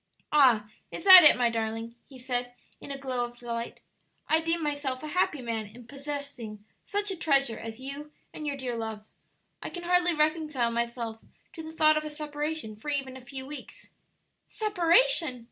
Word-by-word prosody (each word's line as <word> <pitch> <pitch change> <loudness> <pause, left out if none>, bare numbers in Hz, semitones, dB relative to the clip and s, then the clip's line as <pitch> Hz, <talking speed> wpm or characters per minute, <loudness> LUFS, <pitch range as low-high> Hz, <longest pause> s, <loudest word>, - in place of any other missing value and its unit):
"Ah, 250 -8 +5 0.2
is - - -7
that 370 -3 +12
it, 300 - +8
my 240 -2 +2
darling?" 225 0 -3 0.2
he 270 - -13
said, 245 -1 -3 0.2
in - - -11
a 275 - -5
glow 260 -2 -2
of 240 0 -7
delight. 235 -1 -6 0.5
"I 320 +1 +3
deem 330 0 -1
myself 285 -3 -3
a 305 - -5
happy 300 -5 0
man 225 -2 -3
in 235 +3 -14
possessing 275 -6 -7 0.2
such 410 0 -1
a - - -3
treasure 275 -7 +1
as 225 +1 -8
you 280 +3 -8 0.2
and 305 - -6
your 285 -1 -2
dear 255 -3 -4
love. 220 -2 -5 0.6
I - - -5
can 350 - -8
hardly 355 -1 +2
reconcile 305 -5 +1
myself 235 -1 -3 0.3
to 325 - -8
the 315 0 -8
thought 310 -1 +4
of 305 - -1
a 305 - -5
separation 300 -5 -5
for 220 +8 -8
even 275 -3 -2
a 260 - -10
few 265 +2 -8
weeks." 290 +1 -10 0.6
"Separation!" 360 - +2
275 Hz, 180 wpm, -28 LUFS, 235-310 Hz, 0.6 s, that